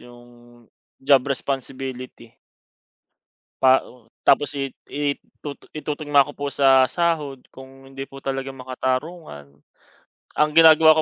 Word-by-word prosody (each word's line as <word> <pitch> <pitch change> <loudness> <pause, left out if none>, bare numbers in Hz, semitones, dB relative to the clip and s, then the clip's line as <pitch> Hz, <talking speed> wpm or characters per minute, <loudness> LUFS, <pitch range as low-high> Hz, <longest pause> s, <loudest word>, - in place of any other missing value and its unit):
'yung 120 -1 -18 0.3
job 135 0 +4
responsibility. 130 -3 -5 1.3
Pa 130 0 +6
o 120 -2 -19 0.2
tapos 145 0 +4
i 135 -1 -4 0.2
i 145 0 -1
itutu 145 -2 -12
itutugma 145 -2 +1
ko 145 - -10
po 145 0 -4
sa 135 -1 +5
sahod, 155 -3 -1 0.2
kung 135 0 -14
hindi 135 0 -8
po 135 - -11
talaga 135 0 -4
makatarungan. 130 - -5 0.8
Ang 150 0 +3
ginagawa 160 -1 +7
135 Hz, 115 wpm, -22 LUFS, 130-145 Hz, 1.3 s, ginagawa